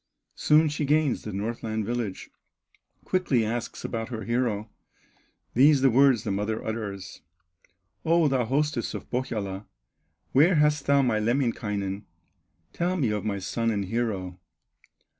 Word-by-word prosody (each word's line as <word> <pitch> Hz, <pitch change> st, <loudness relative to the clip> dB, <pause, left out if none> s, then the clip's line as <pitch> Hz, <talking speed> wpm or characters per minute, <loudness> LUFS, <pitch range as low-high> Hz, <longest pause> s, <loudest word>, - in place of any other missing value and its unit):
Soon 155 Hz, +1 st, +4 dB
she 150 Hz, 0 st, -2 dB
gains 150 Hz, -1 st, +2 dB
the 105 Hz, -, -6 dB
Northland 110 Hz, +1 st, -3 dB
village, 115 Hz, -4 st, -4 dB, 0.7 s
Quickly 145 Hz, -11 st, +1 dB
asks 115 Hz, +2 st, -4 dB
about 115 Hz, +1 st, -3 dB
her 115 Hz, -3 st, -5 dB
hero, 115 Hz, -3 st, -1 dB, 0.9 s
These 140 Hz, +2 st, +5 dB
the 135 Hz, -1 st, +5 dB
words 130 Hz, -2 st, +4 dB
the 105 Hz, -, -2 dB
mother 105 Hz, +3 st, -2 dB
utters: 105 Hz, -4 st, -5 dB, 0.8 s
"O 165 Hz, -1 st, +3 dB
thou 130 Hz, -3 st, +1 dB
hostess 140 Hz, 0 st, -1 dB
of -, -, -8 dB
Pohyola, 105 Hz, -6 st, -3 dB, 0.6 s
Where 160 Hz, +7 st, +5 dB
hast 150 Hz, -1 st, +2 dB
thou 140 Hz, 0 st, +4 dB
my 115 Hz, -4 st, +1 dB
Lemminkainen? 105 Hz, -4 st, -1 dB, 0.7 s
Tell 180 Hz, +2 st, 0 dB
me 130 Hz, -10 st, +1 dB
of 105 Hz, -1 st, -2 dB
my 105 Hz, -2 st, -1 dB
son 115 Hz, +4 st, -1 dB
and 100 Hz, -3 st, -1 dB
hero!" 95 Hz, -4 st, -3 dB
115 Hz, 135 wpm, -26 LUFS, 105-140 Hz, 0.9 s, These